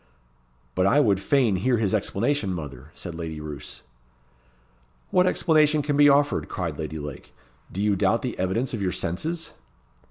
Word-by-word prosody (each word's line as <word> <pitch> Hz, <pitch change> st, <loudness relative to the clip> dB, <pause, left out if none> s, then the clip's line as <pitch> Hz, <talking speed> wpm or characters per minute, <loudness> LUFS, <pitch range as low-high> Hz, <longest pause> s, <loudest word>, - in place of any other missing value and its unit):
"But 95 Hz, +7 st, +2 dB
I 140 Hz, +9 st, +4 dB
would 100 Hz, -9 st, +3 dB
fain 120 Hz, -3 st, +2 dB
hear 125 Hz, +6 st, +2 dB
his 105 Hz, -3 st, 0 dB
explanation, 110 Hz, +2 st, 0 dB
mother," 75 Hz, -8 st, -7 dB
said 85 Hz, -, -7 dB
Lady 80 Hz, -2 st, -5 dB
Roos. 75 Hz, -2 st, -8 dB, 1.3 s
"What 180 Hz, 0 st, +4 dB
explanation 155 Hz, -4 st, +3 dB
can 145 Hz, 0 st, 0 dB
be 145 Hz, 0 st, +7 dB
offered?" 145 Hz, +1 st, +2 dB
cried 85 Hz, -6 st, -4 dB
Lady 80 Hz, 0 st, -4 dB
Lake. 75 Hz, -3 st, -8 dB, 0.4 s
"Do 100 Hz, -, -3 dB
you 105 Hz, -1 st, +2 dB
doubt -, -, +1 dB
the -, -, -4 dB
evidence 105 Hz, +9 st, -1 dB
of 115 Hz, -, -3 dB
your 95 Hz, -2 st, 0 dB
senses?" 160 Hz, -, -3 dB
100 Hz, 160 wpm, -25 LUFS, -, 1.3 s, be